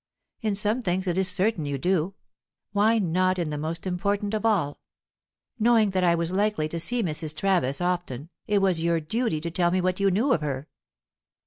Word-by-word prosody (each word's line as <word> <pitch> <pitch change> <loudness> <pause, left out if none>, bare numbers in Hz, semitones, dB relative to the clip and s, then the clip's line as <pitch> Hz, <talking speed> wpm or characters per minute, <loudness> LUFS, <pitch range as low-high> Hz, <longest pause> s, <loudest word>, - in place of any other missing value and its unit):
In 215 -3 0
some 210 +4 0
things 185 -3 -1
it 175 -2 0
is 190 0 +3
certain 190 -3 +1
you 140 -1 -2
do; 180 +4 0 0.6
why 210 +3 +3
not 185 -1 +1
in 165 -4 -2
the - - -3
most 160 +3 -4
important 200 +3 -1
of 215 +1 0
all? 175 -10 0 0.8
Knowing 225 -2 +4
that 185 -1 0
I 170 -1 +4
was 170 0 -2
likely 200 -5 0
to 170 - -4
see 240 +7 0
Mrs. 155 -2 -3
Travis 175 -9 +1
often, 175 -5 -3 0.2
it 205 -1 +2
was 180 -4 +2
your 170 0 +1
duty 165 +2 -1
to 170 +1 -4
tell 175 0 +2
me 185 +2 +1
what 185 +1 0
you 200 0 +3
knew 230 +9 +2
of 155 - 0
her." 140 -1 -3
185 Hz, 200 wpm, -26 LUFS, 165-205 Hz, 0.8 s, Knowing